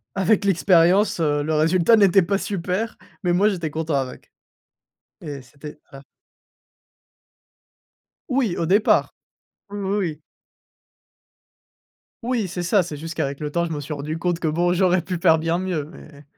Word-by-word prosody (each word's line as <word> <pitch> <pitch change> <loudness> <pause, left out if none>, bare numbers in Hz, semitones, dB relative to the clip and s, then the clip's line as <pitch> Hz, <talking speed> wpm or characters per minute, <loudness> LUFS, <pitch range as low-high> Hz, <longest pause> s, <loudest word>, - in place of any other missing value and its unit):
avec 200 +2 +2
l'expérience, 185 +1 +3
heu, 145 -2 +1
le 155 +1 -2
résultat 170 +7 +4
n'était 195 -2 +5
pas 195 +3 0
super. 195 +3 -3 0.3
Mais, 175 - +1
moi, 200 +4 +3
j'étais 170 -6 -3
content 160 -1 -2
avec 130 -2 -4 0.9
et 145 -5 -7
c'était 150 +3 -12
à 135 -1 -12 2.3
Oui, 250 -8 0
au 165 - -1
départ, 200 +5 +2 0.6
ou - - -9
ou 200 0 -2
oui. 160 -5 -3 2.0
Oui, 230 -5 -1
c'est 175 0 -4
ça. 185 +3 +3
C'est 155 -4 -7
juste 165 +1 -7
qu'avec 140 -2 -3
le 150 -1 -3
temps, 170 +3 0
je 165 - -4
me 150 - -4
suis 150 +2 -5
rendu 150 +3 -5
compte 175 0 -1
que, 160 - 0
bon, 175 +3 +1
j'aurais 185 0 +2
pu 180 +2 -4
faire 165 -2 +4
bien 165 +2 -1
mieux, 180 -5 -2
mais 150 -4 -14
170 Hz, 160 wpm, -22 LUFS, 155-190 Hz, 2.3 s, n'était